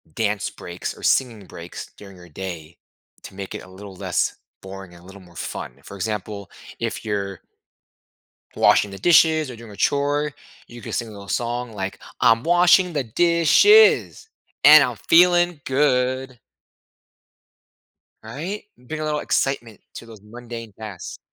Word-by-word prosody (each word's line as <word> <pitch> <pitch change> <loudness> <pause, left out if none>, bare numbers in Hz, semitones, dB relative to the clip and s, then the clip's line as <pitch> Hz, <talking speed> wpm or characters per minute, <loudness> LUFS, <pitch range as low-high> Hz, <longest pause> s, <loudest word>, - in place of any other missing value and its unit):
dance 105 -2 -1
breaks 90 0 -7
or - - -14
singing 115 -7 +1
breaks 85 0 -10
during 100 -2 -13
your 90 -1 -15
day 85 -1 -8 0.5
to - - -11
make 100 -1 -7
it - - -7
a 95 - -15
little 95 0 -11
less - - -1 0.3
boring 95 -2 -10
and 85 0 -16
a - - -18
little 95 +1 -13
more 85 -1 -19
fun. 60 - -6
For 100 - -11
example, 100 0 -5 0.3
if - - -4
you're 100 -3 -3 1.2
washing 100 - +4
the 95 - -9
dishes 160 -3 +4
or - - -8
doing 115 -1 -12
a 100 - -12
chore, 145 +1 0 0.3
you 120 -1 -12
could - - -6
sing 120 - -2
a - - -11
little 100 -1 -11
song 120 0 -3
like, 95 -1 -5 0.2
"I'm 115 +1 +4
washing 175 +1 +4
the 145 -4 -1
dishes, 175 - +4 0.4
and - - +10
I'm - - -1
feeling 175 -1 +4
good." 130 -2 0 1.8
Right? 160 - -6
Bring 125 +6 -8
a - - -3
little 150 -1 -1
excitement 120 -6 -2
to 115 - -9
those 110 -3 -13
mundane 115 0 -9
tasks. 105 -5 -8
115 Hz, 155 wpm, -22 LUFS, 100-145 Hz, 1.8 s, and